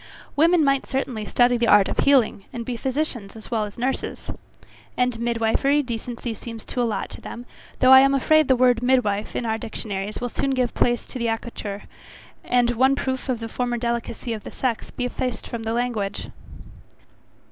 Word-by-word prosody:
Women 330 +2 +4
might 275 -1 +2
certainly 250 -5 -3
study 245 0 +3
the 235 0 +1
art 205 -2 +6
of - - -3
healing, 250 -8 +3
and 235 -2 -5
be 245 - -3
physicians 255 -5 -3
as 220 +1 -11
well 220 -2 +1
as 205 - -10
nurses. 255 +3 -3 0.7
And 250 -2 +1
midwifery, 235 +5 +1
decency 235 -1 -5
seems 225 0 -9
to 250 - -2
allot 230 -3 -1
to - - -9
them, 240 - -8 0.4
though 255 0 +6
I 265 - +11
am 275 +1 +4
afraid 310 +2 +4
the 260 - +5
word 245 -1 +3
midwife, 245 -5 +1
in 240 - -2
our 220 -1 -1
dictionaries, 205 -2 -4
will 245 - -3
soon 270 +3 -1
give 250 -2 0
place 240 -1 +1
to 255 - -7
accoucheur, 225 -3 -3 0.6
and 245 -1 +2
one 260 +3 +3
proof 260 -1 -3
of 245 -3 0
the 230 - -5
former 245 +1 -2
delicacy 235 0 -3
of 215 - -6
the - - -7
sex 245 -4 -2
be 250 - -4
effaced 250 0 -3
from 235 - -5
the 225 0 -3
language. 230 -5 -2
240 Hz, 185 wpm, -23 LUFS, 225-260 Hz, 0.7 s, I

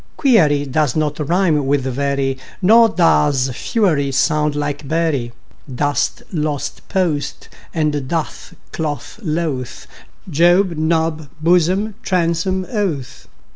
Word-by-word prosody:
Query 155 - +3
does 145 -1 0
not 150 -1 -1
rime 155 -2 +1
with 140 0 +2
very, 135 0 -1 0.2
Nor 225 +4 +6
does 145 -8 +2
fury 155 - 0
sound 150 +2 +1
like 145 -1 -3
bury. 155 -6 0 0.4
Dost, 145 +2 -1
lost, 150 -3 -3
post 170 -7 -2 0.2
and 150 -4 -1
doth, 165 +1 -4 0.2
cloth, 155 +6 -4
loth; 155 - -3 0.4
Job, 175 +4 +4 0.2
Job, 160 -2 0
blossom, 180 +6 +2 0.2
bosom, 180 +1 0
oath. 180 - -3
155 Hz, 105 wpm, -18 LUFS, 145-175 Hz, 0.4 s, Nor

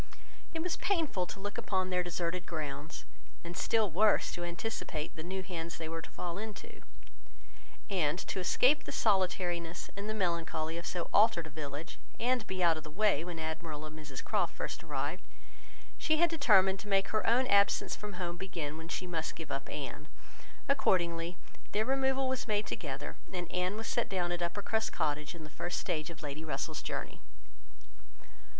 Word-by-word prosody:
It 320 -1 -2
was 360 -2 0
painful 320 - +1
to - - -7
look 205 +1 -3
upon 185 -1 0
their 180 0 +3
deserted 175 0 -2
grounds, 150 -1 -4 0.4
and 170 +1 -6
still 215 0 +2
worse 210 +6 +4
to 175 - -4
anticipate 170 -3 -3
the 155 - -5
new 190 +3 -3
hands 170 -3 -4
they 160 - -4
were 165 0 -3
to - - -10
fall 175 +1 -4
into; 215 -1 -7 1.1
and 170 -6 +2
to 190 - -3
escape 255 +10 +4
the - - -4
solitariness 180 -4 +1
and 200 +2 -4
the 215 - -1
melancholy 170 -4 0
of 170 - -6
so 175 -2 -2
altered 205 -5 +6
a 160 - -9
village, 145 +1 -5 0.2
and 245 -1 +2
be 185 -1 -1
out 165 -2 +5
of 155 - -6
the 155 - -8
way 190 -2 +3
when 175 -1 -5
Admiral 160 -1 -4
and 155 0 -8
Mrs 145 -4 -6
Croft - - +1
first - - -4
arrived, - - -2 0.8
she 310 -1 +3
had 340 +1 +5
determined 195 - +5
to - - -8
make 195 -1 +3
her 215 - +1
own 245 +3 +5
absence 200 -4 +4
from 210 0 -6
home 175 -1 -3
begin 165 -5 -4
when 160 0 -7
she 185 - -2
must 165 -3 -2
give 160 -4 -7
up 135 - -3
Anne. 150 +1 -5 0.6
Accordingly 175 -9 +2 0.4
their 215 +1 +3
removal 265 0 +2
was 260 -1 -1
made 210 -1 +2
together, 140 +1 -4
and 175 -3 -3
Anne 180 +3 0
was 225 - -4
set 240 - 0
down 180 -3 0
at 175 0 -1
Uppercross 205 +5 0
Cottage, 150 +2 -1
in 165 - -8
the 155 - -9
first 175 +2 -2
stage 155 0 -1
of 165 -2 -9
Lady 145 +2 -4
Russell's 160 - -2
journey. - - -4
180 Hz, 185 wpm, -33 LUFS, 160-205 Hz, 1.1 s, altered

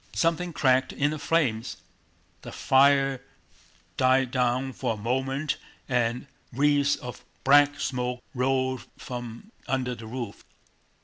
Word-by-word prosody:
Something 170 +1 +1
cracked 130 -3 +2
in 145 +1 0
the 155 - -4
flames. 135 -9 0 0.6
The - - -9
fire 135 -1 +3 0.8
died 130 0 +3
down 130 +1 0
for 115 - -2
a - - -11
moment 135 +6 -1 0.3
and 125 -1 0 0.3
wreaths 145 +2 +3
of 125 0 -9 0.2
black 145 +1 +5
smoke 125 -1 -2
rolled 130 0 0
from 120 - -8 0.2
under 130 -2 -1
the 115 -2 -9
roof. 120 -3 -6
130 Hz, 120 wpm, -26 LUFS, 125-140 Hz, 0.8 s, black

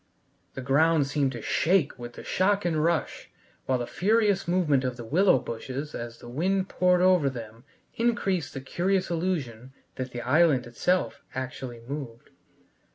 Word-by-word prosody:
The 130 - -5
ground 150 +3 +3
seemed 140 -1 0
to 120 - -7
shake 160 -7 +1
with 120 0 -7
the - - -10
shock 200 +1 +1
and 160 -3 +1
rush 170 -1 -1 0.4
while 130 - +2
the 120 - -3
furious 205 - +1
movement 165 -7 +2
of 125 -1 -2
the 120 - -7
willow 180 - +4
bushes 130 +5 -5
as 120 0 -6
the - - -13
wind 185 +9 0
poured 180 -1 +3
over 180 -6 +4
them 115 -1 -9 0.3
increased 195 - 0
the 135 - -4
curious 185 +6 0
illusion 140 -9 -3 0.2
that 130 0 -3
the 120 -1 -6
island 140 0 +3
itself 140 +4 -1
actually 130 -2 -5
moved. 135 -5 -7
145 Hz, 160 wpm, -27 LUFS, 125-180 Hz, 0.4 s, willow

